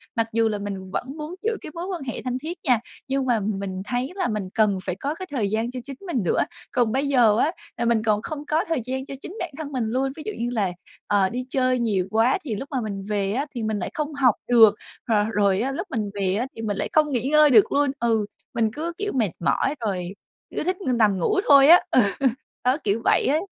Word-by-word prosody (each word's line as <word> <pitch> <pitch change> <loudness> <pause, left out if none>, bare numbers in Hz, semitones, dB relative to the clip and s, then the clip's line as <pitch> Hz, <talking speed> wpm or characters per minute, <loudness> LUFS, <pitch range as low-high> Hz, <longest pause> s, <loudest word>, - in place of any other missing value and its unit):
Mặc 230 -1 +1
dù 225 0 +3
là 210 - -2
mình 195 -2 -6
vẫn 265 +9 -4
muốn 310 +3 -6
giữ 445 0 0
cái - - -8
mối 340 +1 -4
quan 365 -6 -4
hệ 250 - -5
thân 250 -1 -2
thiết 325 +6 -6
nha, 250 -7 +3 0.3
nhưng 270 0 0
mà 240 -3 +2
m 200 -1 -2
mình 190 -1 -4
thấy 250 - -2
là 370 -3 0
mình 210 -4 -3
cần 210 -3 +3
phải 180 - -3
có 280 +10 -3
cái 370 - -6
thời 225 -8 0
gian 225 +3 -1
cho 255 - -5
chính 275 +1 -8
mình 260 - -1
nữa. 175 - +1 0.3
Còn 240 -3 +2
bây 270 +4 0
giờ 240 -6 +4
á 295 - +2 0.3
là 235 - -1
mình 230 -2 +2
còn 210 -2 +2
không 300 +4 -6
có 310 +3 +1
thời 325 -6 0
gian 265 +1 -3
cho 275 - -7
chính 385 - -9
bản 350 - -3
thân 305 -2 -6
mình 255 -4 -1
luôn, 265 +3 0
ví 310 - -8
dụ 430 - -2
như 240 +1 -1
là, 210 -6 0 0.4
ờ, 200 -2 +3
đi 250 +3 -4
chơi 255 -1 +1
nhiều 200 -6 0
quá 225 +4 +3
thì 235 -8 -3
lúc 270 +7 -6
mà 260 -3 -1
mình 200 -3 -4
về 200 -1 0
á 270 +5 -1
thì 235 - -3
mình 215 -1 -1
lại - - -3
không 305 -2 -3
học 260 -6 +3
được, 225 -4 +7 0.3
rồi 210 -2 +2
rồi 200 -1 +2
á, 265 +3 -1
lúc 340 +8 -4
mình 215 -3 -2
về 195 -2 0
á 240 +5 -1
thì 225 - -7
mình 210 -3 -2
lại - - -2
không 305 -1 +3
nghỉ 250 -1 0
ngơi 305 0 +6
được 225 -6 +6
luôn. 285 -1 +2
Ừ, 225 -3 +1 0.3
mình 225 -2 +1
cứ 325 +4 -4
kiểu 410 0 -2
mệt 220 -8 +1
mỏi 270 - +1
rồi 185 -2 -3 0.4
cứ - - -1
thích 365 +3 -1
nằm 225 - +2
ngủ 420 - +1
thôi 280 -1 +8
á. 345 +3 +9
Ừ, - - +5 0.7
đó, 255 +2 +3
kiểu 210 +2 +1
vậy - - +3
á. 295 +3 +3
245 Hz, 260 wpm, -24 LUFS, 210-285 Hz, 0.7 s, á